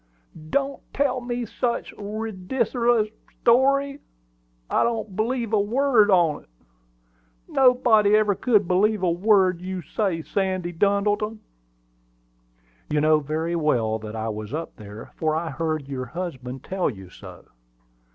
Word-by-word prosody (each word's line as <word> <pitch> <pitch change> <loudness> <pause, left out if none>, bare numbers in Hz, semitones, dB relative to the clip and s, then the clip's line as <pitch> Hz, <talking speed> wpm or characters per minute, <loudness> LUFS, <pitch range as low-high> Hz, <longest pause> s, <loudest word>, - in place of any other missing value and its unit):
"Don't 275 - -1
tell 260 -2 +1
me 245 0 -3
such 235 +2 -3
a - - -13
ry 215 +2 -4
dicerlous 230 +2 0 0.3
story! 275 +3 +3 0.7
I - - +1
don't 225 -4 -2
believe 230 +1 -1
a 215 - +4
word 235 0 +3
on't. 170 -6 +2 1.0
Nobody 240 -5 +4
ever 215 -1 +3
could 210 -3 +2
believe 200 +2 +2
a 175 - +3
word 185 -1 +3
you 185 -1 -5
say, 175 -1 -2
Sandy 185 -2 -2
Duddleton!" 205 +4 +1 1.5
"You 150 - +1
know 155 +1 +4
very 160 +3 -2
well 120 -9 +1
that 110 0 -8
I 110 0 -3
was 110 +4 -5
up 165 +1 -5
there; 105 +1 -11
for 155 -1 0
I 160 0 -2
heard 155 -1 -2
your 130 -2 -4
husband 135 -5 -6
tell 190 -1 -1
you 95 -6 -10
so. - - -12
195 Hz, 135 wpm, -24 LUFS, 155-225 Hz, 1.5 s, a